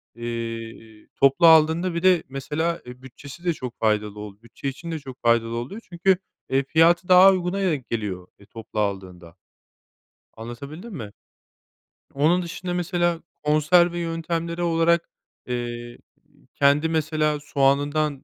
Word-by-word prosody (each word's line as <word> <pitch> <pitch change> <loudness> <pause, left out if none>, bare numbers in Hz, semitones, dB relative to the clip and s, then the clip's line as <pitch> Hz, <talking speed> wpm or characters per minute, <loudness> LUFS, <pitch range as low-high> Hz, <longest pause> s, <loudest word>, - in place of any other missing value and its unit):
eee, 115 -2 -7
toplu 140 +5 +4
aldığında 160 +3 +5
bir 170 +1 -3
de, 185 -3 +4
mesela, 150 +5 -2
eee, 125 +1 -11
bütçesi 140 +5 -12
de 175 - +2
çok 125 -5 -8
faydalı 105 -1 0
oldu. 105 0 -10
Bütçe 120 +4 -8
için 165 +5 -8
de 160 - -3
çok 135 -3 -11
faydalı 115 0 +2
oluyor 130 - -6
çünkü, 180 +2 +2 0.3
eee, 135 +1 +2
fiyatı 170 +5 +3
daha 185 +1 +8
uyguna 185 +1 -1
denk 155 -10 -1
geliyor, 100 -6 -4
eee, 100 - -17
toplu 110 0 -8
aldığında. 95 -4 -4 1.0
Anlatabildim 140 - -9
mi? 110 - -7 1.0
Onun 155 +6 +2
dışında, 180 +1 -5
mesela, 175 -1 0 0.2
konserve 170 +4 +3
yöntemleri 170 0 -3
olarak, 170 0 +2 0.4
eee, 120 -1 -5 0.6
kendi, 145 +3 +3
mesela, 155 -1 0
soğanından, 145 0 0
150 Hz, 130 wpm, -23 LUFS, 120-170 Hz, 1.0 s, daha